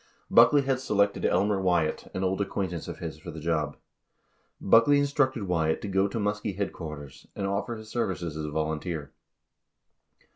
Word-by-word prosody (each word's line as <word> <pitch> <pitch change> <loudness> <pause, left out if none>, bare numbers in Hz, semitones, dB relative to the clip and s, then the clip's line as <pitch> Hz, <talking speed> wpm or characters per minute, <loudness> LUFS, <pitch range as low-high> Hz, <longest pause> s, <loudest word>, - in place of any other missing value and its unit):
16 - - -7
Buckley 120 +5 +7
had 135 -1 0
selected 100 -5 +1
Elmer 100 +2 +2
Wyatt, 85 -4 0
an 95 - -1
old 95 +1 0
acquaintance 95 -4 -3
of - - -6
his, 80 -2 -6
for 85 - -9
the 80 -1 -7
job. 75 -2 -1 0.8
Buckley 115 +8 +5
instructed 140 -4 +1
Wyatt 80 -4 0
to - - -3
go 95 0 +2
to 100 - -5
Muskie 105 -2 -2
headquarters 75 -8 -6
and 100 - -3
offer 100 +4 -2
his 110 -1 -10
services 95 -9 -2
as 80 0 -4
a - - -4
volunteer. 80 0 -3
95 Hz, 170 wpm, -27 LUFS, 80-105 Hz, 0.8 s, Buckley